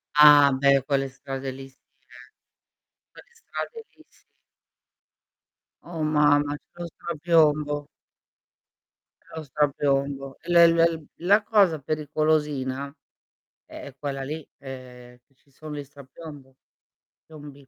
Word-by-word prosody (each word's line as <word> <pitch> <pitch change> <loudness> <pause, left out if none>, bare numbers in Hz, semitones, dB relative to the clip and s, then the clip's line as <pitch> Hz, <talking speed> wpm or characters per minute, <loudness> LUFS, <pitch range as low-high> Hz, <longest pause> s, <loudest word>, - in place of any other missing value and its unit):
Ah, 145 -1 +8
beh, 140 +1 +3
quelle 135 -1 0
strade 135 0 -6
lì 135 +1 -10
si, 130 - -28 0.2
eh. 130 - -40 1.1
Quelle 475 - -18
strade 455 0 -7
lì - - -21
si. - - -29 1.6
Oh, 170 -2 -7
mamma, 145 -1 +2
c'è 175 +3 -15
lo - - -4
strapiombo. 155 -3 0 1.3
C'è - - -16
lo 160 - -6
strapiombo. 140 -1 -1
L 175 - -3
l 170 -1 +7 0.2
l 160 -2 -10 0.2
la 205 +3 +4
cosa 200 -8 +3
pericolosina 150 -2 -1 0.8
è - - -11
è 140 - -10
quella 135 -1 -4
lì, 150 +4 -5 0.2
ehm, 125 -2 -11
che 135 - -36
ci 140 - -33
son 150 +3 -10
gli 145 -1 -6
strapiombo 140 -1 -13 0.7
piombi. 145 -3 -13
145 Hz, 120 wpm, -25 LUFS, 135-155 Hz, 1.6 s, Ah